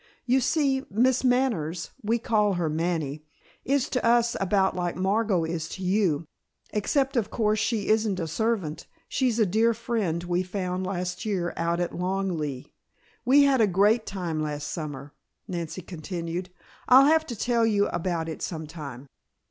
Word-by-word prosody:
You 255 +2 +3
see, 270 0 +1
Miss 250 +5 +2
Manners, 225 - 0
we 225 +2 +1
call 215 -3 +2
her 175 -3 -1
Manny 155 -2 -2 0.4
is 275 -1 +1
to 255 - -1
us 235 0 +3
about 190 0 +2
like 175 -1 -2
Margot 195 -1 +1
is 160 -1 -3
to 190 - -7
you. 180 -5 +1 0.5
Except, 270 +6 0
of 230 -4 +1
course, 215 -2 +1
she 220 -3 -1
isn't 215 -3 +2
a 165 - -1
servant, 195 -4 -2 0.2
she's 250 -4 0
a 220 - +4
dear 220 +5 +2
friend 210 -8 -2
we 175 0 0
found 185 0 -3
last 180 -1 -3
year 185 -5 -1
out 170 +1 0
at 175 -1 -2
Long 190 +1 -1
Leigh. 145 -5 -5 0.5
We 275 +3 +6
had 275 -3 +4
a 215 - +5
great 205 +5 +3
time 175 -5 -3
last 150 -1 -3
summer," 145 -3 -6 0.3
Nancy 175 -1 -5
continued. 175 +1 -5 0.4
"I'll 260 +2 +8
have 315 +1 +3
to 240 - -5
tell 230 +1 +1
you 205 -2 +3
about 170 -2 -2
it 160 - -6
some 160 -3 -4
time." 145 -5 -8
190 Hz, 165 wpm, -26 LUFS, 170-230 Hz, 0.5 s, I'll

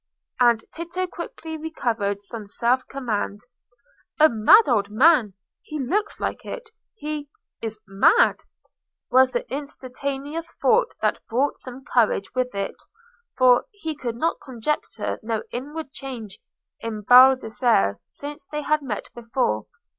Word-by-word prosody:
And 235 -2 +4
Tito 340 +3 -3
quickly 330 -2 -7
recovered 230 -10 -2
some 215 0 -7
self 240 +5 +1
command. 220 -6 -3 0.8
"A 310 +1 +8
mad 230 - +6
old 210 -6 +2
man—he 230 - +1
looks 390 +11 -1
like - - -3
it—he 435 - -7 0.3
is 220 -1 -4
mad!" 200 - +4 0.7
was 260 +1 +5
the - - -2
instantaneous 280 +2 -5
thought - - +3
that - - +1
brought 265 +5 0
some 255 +1 -10
courage 220 -7 +1
with 250 -3 -1
it; 195 0 -4 0.6
for 255 - +5
he 365 -9 -6
could 240 -4 -5 0.2
conjecture 260 +3 -3
no 220 -1 -2
inward 290 +4 -6
change 240 -8 -8 0.4
in 220 -2 -5
Baldassarre 245 - +5
since 290 -1 -8
they 300 0 -4
had 305 +1 +2
met 235 -7 -5
before. 230 - -1
255 Hz, 120 wpm, -24 LUFS, 225-305 Hz, 0.8 s, A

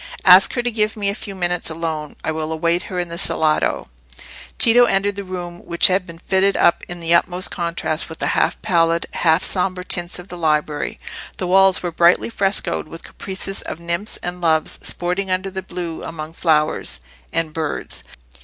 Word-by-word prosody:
"Ask 185 +1 +7
her 240 - 0
to 245 - 0
give 215 -1 0
me 200 -1 0
a - - -1
few 200 -1 -8
minutes 175 -2 -1
alone; 160 -2 -4
I - - -1
will 155 0 -3
await 170 +2 +1
her 185 - -5
in 175 -1 -2
the 170 0 -5
salotto." 155 -1 +1 0.7
Tito 245 +1 +6
entered 200 -1 0
a - - -4
room 175 -2 -7
which 170 0 +2
had 185 0 0
been 170 -1 -10
fitted 190 +3 +1
up 170 - +3
in 175 0 -6
the 165 0 +2
utmost 180 +1 +2
contrast 170 -2 -1
with 160 - -8
the - - 0
half - - +1
pallid, 165 -1 +2
half 165 +1 +2
sombre 185 -1 +1
tints 175 -1 -4
of 180 +1 -10
the 175 - -8
library. 150 -2 -1 0.4
The 185 - -3
walls 190 +1 +4
were 175 - -2
brightly 170 +6 +3
frescoed 195 -6 -1
with 165 +1 -10
"caprices" 195 0 -5
of - - -7
nymphs 170 +5 -1
and 175 0 -4
loves 160 -2 +2
sporting 180 +2 -1
under 185 +1 -1
the 190 0 -4
blue 175 -3 -6
among 160 -1 -7
flowers 155 - +1 0.3
and 165 -1 -1
birds. 155 -2 -3
175 Hz, 190 wpm, -20 LUFS, 165-190 Hz, 0.7 s, Ask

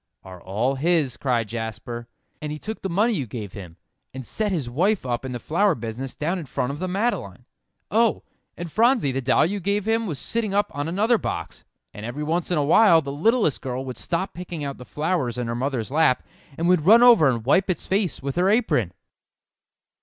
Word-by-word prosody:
"Are 90 -2 -11
all 110 +8 -1
his," 145 -2 +1
cried 120 -5 0
Jasper, 115 +1 -5 0.3
"and 150 -1 -4
he 150 - -4
took 220 +8 -6
the 190 - -3
money 210 +7 +2
you 140 - -2
gave 105 -3 -7
him, 90 -5 -10 0.4
and 130 -1 -6
set 215 - -2
his 155 -9 -1
wife 180 - +1
up 120 0 -2
in 130 - -4
the 125 - -3
flower 170 - +1
business 120 +2 -6
down 170 +5 -2
in 155 - -8
front 125 +1 -2
of 145 - -7
the 185 - -2
Madeleine. 205 +7 -2 0.5
Oh! 230 0 +2 0.3
and 170 -1 -6
Phronsie, 230 - +3
the 135 +1 -2
doll 130 +3 +3
you 200 +5 -2
gave 200 +2 -1
him 225 0 +1
was 155 -6 -4
sitting 215 - -2
up 205 - +1
on 145 +1 -2
another 215 +7 +2
box, 85 +1 -5 0.3
and 105 - -9
every 120 +6 -4
once 165 +3 -1
in 175 - +1
a 145 - +1
while 165 0 +6
the 140 - -5
littlest 190 - +1
girl 130 0 -4
would 130 -1 -6
stop 180 +3 -2
picking 175 -3 -6
out 140 -2 -5
the 125 - -10
flowers 150 -6 -1
in 125 - -2
her 115 - -3
mother's 125 -1 -2
lap, 145 -4 +3 0.3
and 170 - 0
would 180 -2 +4
run 230 +4 +8
over 230 - +7
and 115 -3 -2
wipe 185 +9 +3
its 185 - -2
face 190 -7 -1
with 140 +2 -3
her 180 +2 +3
apron." 200 - +1
150 Hz, 215 wpm, -24 LUFS, 125-195 Hz, 0.5 s, run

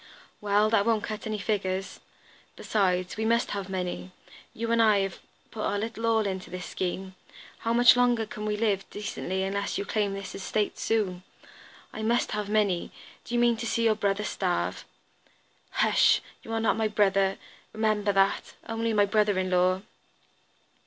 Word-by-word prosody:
"Well, 210 +1 +2
that 225 -3 +4
won't 220 -2 +2
cut 215 0 -5
any 215 -1 -2
figure. 195 -3 -1 0.8
Besides, 185 -3 0
we 220 - -1
must 235 +1 +1
have 200 -1 -4
money. 185 -1 -3 0.4
You 230 +1 -3
and 230 0 +4
I 215 -2 +5
have 195 -2 -3 0.3
put 220 - -6
our 205 - 0
little 225 +2 -3
all 225 -1 +3
into 190 -2 -4
this 180 0 -6
scheme. 190 +1 -4 0.5
How 230 - -1
much 240 +1 +7
longer 245 -2 +3
can 215 0 -6
we 210 0 -1
live 205 -3 0
decently 190 -2 -3
unless 200 +1 -2
you 200 - -3
claim 205 -1 -1
this 195 -1 -7
estate 205 +2 -2
soon? 195 -5 0 0.7
I 220 - -5
must 235 +2 +1
have 210 -1 -3
money! 205 -5 +1 0.3
Do 240 - -4
you - - +3
mean 240 -1 +3
to 230 +1 -4
see 230 - 0
your 225 -1 +4
brother 205 -1 0
starve?" 185 -3 -2 0.8
"Hush! - - +4 0.2
You 225 - -9
are 225 - +1
not 225 0 +1
my 220 -1 +1
brother, 195 -2 +2 0.3
remember 215 -1 +1
that; 195 0 +1
only 225 0 -1
my 205 -1 +4
brother 205 -1 +2
in 185 0 -1
law." 185 +1 +2
210 Hz, 175 wpm, -27 LUFS, 195-220 Hz, 0.8 s, much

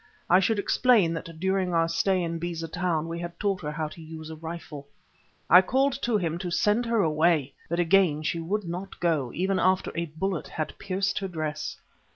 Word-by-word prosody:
I 180 - +7
should 210 +3 +1
explain 205 -4 +3
that 165 -1 -7
during 190 -1 0
our 165 0 +3
stay 180 +3 +1
in 165 0 -3
Beza 165 -1 -4
Town 165 -1 -1
we 165 0 -4
had 170 0 -7
taught 200 -3 0
her 150 -2 -3
how 155 +1 -2
to 165 - -12
use 160 0 -8
a - - -6
rifle. 160 -3 -8 0.6
I 180 - +9
called 265 +7 +2
to 235 -3 +2
him 170 -3 -2
to 180 0 -3
send 210 +7 +2
her 230 -3 +2
away, 155 -3 +2 0.2
but 170 +1 -1
again 175 -3 +3
she 165 +2 -1
would 200 +6 -2
not 180 +3 -6
go, 155 -8 0
even 190 +2 0
after 185 +1 +2
a 170 0 -2
bullet 170 +3 -3
had 155 -2 -4
pierced 195 0 -1
her 195 - -3
dress. 155 -4 -4
170 Hz, 200 wpm, -27 LUFS, 160-190 Hz, 0.6 s, I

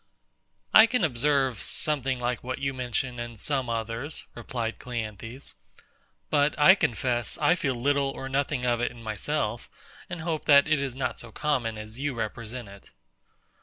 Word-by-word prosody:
I 220 +1 +10
can 230 -3 0
observe 135 -4 +2
something 135 -4 0
like 120 -1 -2
what 130 +1 -3
you 135 0 -2
mention 125 0 -2
in 120 -1 -6
some 135 +2 -1
others, 115 +5 -3
replied 115 -1 -4
CLEANTHES: 115 +1 -6 0.8
but 145 0 +3
I 150 +6 +8
confess 120 - 0
I - - +4
feel 140 -7 -1
little 140 +3 +1
or 135 -1 -6
nothing 135 -1 -1
of 120 -1 +1
it 120 - +1
in 120 -1 -13
myself, 110 -3 -2 0.4
and 175 -3 -5
hope 160 -2 -2
that 140 0 +7
it 155 -1 +3
is 135 -3 -3
not 135 - -2
so 120 - -8
common 120 -5 -1
as 110 +3 -8
you 145 -2 -1
represent 115 +1 -5
it. 100 0 -14
125 Hz, 165 wpm, -27 LUFS, 115-145 Hz, 0.8 s, I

